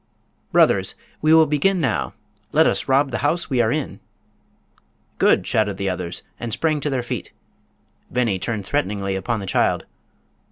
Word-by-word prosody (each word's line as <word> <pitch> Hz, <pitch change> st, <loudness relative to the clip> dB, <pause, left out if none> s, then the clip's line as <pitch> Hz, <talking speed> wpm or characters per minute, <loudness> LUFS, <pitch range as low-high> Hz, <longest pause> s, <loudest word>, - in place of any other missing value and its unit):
"Brothers! -, -, +3 dB, 0.3 s
we 155 Hz, -, +3 dB
will 160 Hz, 0 st, +7 dB
begin 155 Hz, +6 st, +1 dB
now. 165 Hz, -, -1 dB, 0.4 s
Let 160 Hz, +1 st, +5 dB
us -, -, +1 dB
rob 135 Hz, +1 st, +3 dB
the -, -, -2 dB
house 155 Hz, +4 st, 0 dB
we 125 Hz, -2 st, +3 dB
are 110 Hz, -1 st, +2 dB
in." 150 Hz, -1 st, -3 dB, 1.2 s
"Good!" -, -, +4 dB
shouted 105 Hz, -3 st, 0 dB
the 100 Hz, -1 st, -1 dB
others 90 Hz, -1 st, -5 dB, 0.2 s
and 120 Hz, -1 st, -4 dB
sprang 155 Hz, +6 st, 0 dB
to 150 Hz, -, -2 dB
their 130 Hz, -3 st, -1 dB
feet. 120 Hz, -, -5 dB, 0.8 s
Beni 115 Hz, -6 st, 0 dB
turned 110 Hz, 0 st, -3 dB
threateningly 100 Hz, 0 st, -1 dB
upon 105 Hz, +3 st, -2 dB
the -, -, -5 dB
child. 95 Hz, -, +1 dB
120 Hz, 160 wpm, -22 LUFS, 100-150 Hz, 1.2 s, will